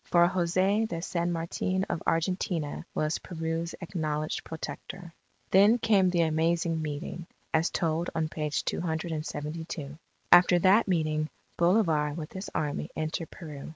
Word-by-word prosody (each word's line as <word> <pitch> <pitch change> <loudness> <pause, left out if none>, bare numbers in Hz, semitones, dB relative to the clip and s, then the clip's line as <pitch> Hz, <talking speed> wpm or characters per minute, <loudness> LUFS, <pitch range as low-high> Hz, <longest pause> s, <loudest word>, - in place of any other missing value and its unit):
For 175 0 +4
Jose 185 +4 +2
de 170 -5 -4
San 170 0 -1
Martin 175 +3 -1
of - - -2
Argentina, 165 -2 -1
was 155 +1 0
Peru's 165 0 -3
acknowledged 155 -4 -2
Protector. 165 +3 -7 0.4
Then 205 +5 +6
came 205 -5 +4
the 175 -2 +2
Amazing 165 +1 +1
Meeting, 155 +3 -5 0.3
as 160 +1 +3
told 165 0 0
on 160 -1 +1
page 150 -1 -2
272. 160 -2 -4 0.3
After 175 0 +8
that 190 +6 +5
meeting, 155 -4 0 0.3
Bolivar 165 -5 +2
with 155 -2 -6
his 190 +1 -6
Army 150 +2 -2
entered 155 +1 -3
Peru. 150 -5 -9
165 Hz, 130 wpm, -29 LUFS, 155-180 Hz, 0.4 s, After